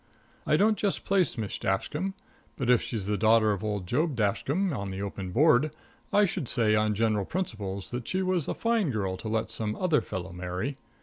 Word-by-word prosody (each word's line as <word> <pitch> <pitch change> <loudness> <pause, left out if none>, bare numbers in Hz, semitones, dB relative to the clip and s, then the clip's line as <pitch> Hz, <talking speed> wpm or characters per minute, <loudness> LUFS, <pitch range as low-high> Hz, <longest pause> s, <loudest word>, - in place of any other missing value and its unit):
I 150 - +4
don't 215 +4 +3
just 200 -2 0
place 190 -7 +2
Miss 110 -3 -3
Dashkam, 150 - -1 0.4
but 125 -3 +2
if 125 - +5
she's 110 -5 -3
the 105 -1 -1
daughter 110 0 +5
of 100 0 -3
old 105 -3 -2
Job 145 - 0
Dashkam, 140 - 0
on 100 -2 -4
the 95 0 -5
open 100 -1 -4
Board, 150 - +4 0.4
I 210 0 +5
should 170 - -3
say, 110 -2 +2
on 105 0 +2
general 110 -1 +1
principles, 100 - -4
that 120 -1 -4
she 190 +1 0
was 185 -5 0
a - - -2
fine 230 -7 +1
girl 100 -6 -1
to 110 - -7
let 110 0 -1
some 110 -2 -2
other 170 -5 +2
fellow 95 -2 -5
marry. 90 +10 -4
115 Hz, 200 wpm, -28 LUFS, 100-160 Hz, 0.4 s, if